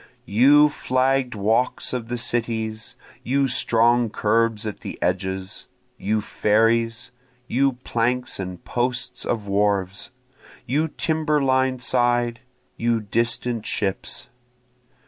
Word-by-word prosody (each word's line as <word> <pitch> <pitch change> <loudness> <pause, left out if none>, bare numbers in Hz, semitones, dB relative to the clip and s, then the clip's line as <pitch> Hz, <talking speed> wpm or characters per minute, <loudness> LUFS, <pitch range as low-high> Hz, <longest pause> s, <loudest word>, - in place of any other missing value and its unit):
You 140 +8 +6
flagg'd 130 -3 0
walks 110 +7 0
of 120 -3 -3
the 120 +1 -3
cities! 110 -2 -2 0.3
you 135 +2 +1
strong 120 -1 +3
curbs 110 +1 +1
at 105 - -5
the - - -7
edges! 95 +1 -3 0.3
You 105 +2 0
ferries! 115 +3 +1 0.4
you 135 +2 +2
planks 125 -1 -1
and 90 -2 -6
posts 125 0 -2
of 110 -4 -2
wharves! 100 -1 0 0.6
you 145 +6 +1
timber 155 -1 0
lined 130 -2 +1
side! 120 -1 +1 0.4
you 115 0 +1
distant 115 +1 -1
ships! 95 -2 -2
115 Hz, 105 wpm, -23 LUFS, 110-125 Hz, 0.6 s, You